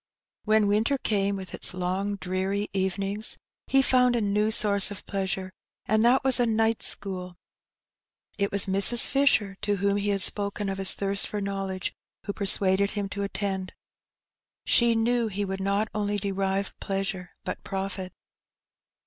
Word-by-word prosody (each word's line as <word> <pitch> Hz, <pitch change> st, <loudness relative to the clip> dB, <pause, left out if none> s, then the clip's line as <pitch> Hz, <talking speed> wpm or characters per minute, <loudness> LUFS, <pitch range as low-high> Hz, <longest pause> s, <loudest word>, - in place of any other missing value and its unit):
When 215 Hz, -1 st, +3 dB
winter 220 Hz, +7 st, +2 dB
came, 200 Hz, -5 st, 0 dB
with 190 Hz, -1 st, -8 dB
its -, -, -5 dB
long 185 Hz, +3 st, -2 dB
dreary 195 Hz, +2 st, -2 dB
evenings, 195 Hz, +2 st, -1 dB, 0.3 s
he 270 Hz, 0 st, +4 dB
found 250 Hz, -1 st, +3 dB
a -, -, +1 dB
new 210 Hz, +1 st, +1 dB
source 205 Hz, -2 st, +4 dB
of 205 Hz, -, -9 dB
pleasure, 190 Hz, -1 st, -3 dB, 0.3 s
and 215 Hz, +1 st, +2 dB
that 245 Hz, +3 st, +4 dB
was 265 Hz, -1 st, +5 dB
a 240 Hz, -, +3 dB
night 225 Hz, 0 st, +1 dB
school. 180 Hz, -2 st, -4 dB, 1.0 s
It 200 Hz, -1 st, -1 dB
was 200 Hz, -1 st, +2 dB
Mrs, 200 Hz, +5 st, +5 dB
Fisher 220 Hz, -8 st, +2 dB
— -, -, -47 dB
to 205 Hz, -1 st, 0 dB
whom 200 Hz, +1 st, 0 dB
he 205 Hz, 0 st, -1 dB
had 200 Hz, -1 st, +1 dB
spoken 200 Hz, 0 st, +2 dB
of 195 Hz, 0 st, -4 dB
his 195 Hz, -, +2 dB
thirst 195 Hz, 0 st, 0 dB
for 210 Hz, -, -4 dB
knowledge 195 Hz, -2 st, -3 dB, 0.2 s
— -, -, -36 dB
who 200 Hz, -, -3 dB
persuaded 195 Hz, -1 st, +2 dB
him 205 Hz, -2 st, -4 dB
to 200 Hz, -, -5 dB
attend. 195 Hz, -2 st, -3 dB, 0.9 s
She 235 Hz, -1 st, +4 dB
knew 235 Hz, +1 st, +1 dB
he 205 Hz, -1 st, -3 dB
would 195 Hz, 0 st, -4 dB
not 200 Hz, +2 st, 0 dB
only 205 Hz, -1 st, -1 dB
derive 195 Hz, 0 st, -2 dB
pleasure, 195 Hz, -2 st, -4 dB
but -, -, -5 dB
profit. 190 Hz, -1 st, -4 dB
200 Hz, 165 wpm, -26 LUFS, 195-215 Hz, 1.0 s, was